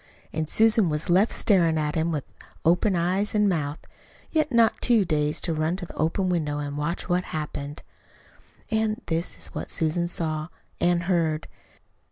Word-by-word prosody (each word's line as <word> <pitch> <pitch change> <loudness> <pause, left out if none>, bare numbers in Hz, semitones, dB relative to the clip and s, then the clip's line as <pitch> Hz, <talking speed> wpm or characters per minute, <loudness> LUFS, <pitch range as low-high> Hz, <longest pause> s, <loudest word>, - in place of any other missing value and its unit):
And 155 0 -2
Susan 220 -4 +4
was 150 +3 -1
left 195 +6 +4
staring 170 -6 +3
at 150 -1 0
him 165 +1 0
with 150 -4 -2 0.4
open 180 +4 +3
eyes 185 +5 0
and 210 -1 +4
mouth 150 -5 -1 0.5
yet 310 -2 +1
not 230 -2 +3
too 230 -5 +4
dazed 150 -2 0
to 165 - 0
run 155 +2 0
to 185 -1 -6
the - - -11
open 185 +4 0
window 155 -5 0
and 145 -1 -4
watch 150 +5 -3
what 180 0 +1
happened. 150 -1 -5 0.9
And 220 +1 0
this 165 +1 -2
is - - -5
what - - -5
Susan 165 +2 +1
saw 155 -3 -2 0.3
and 175 0 +2
heard. 165 -3 0
170 Hz, 170 wpm, -25 LUFS, 155-195 Hz, 0.9 s, Susan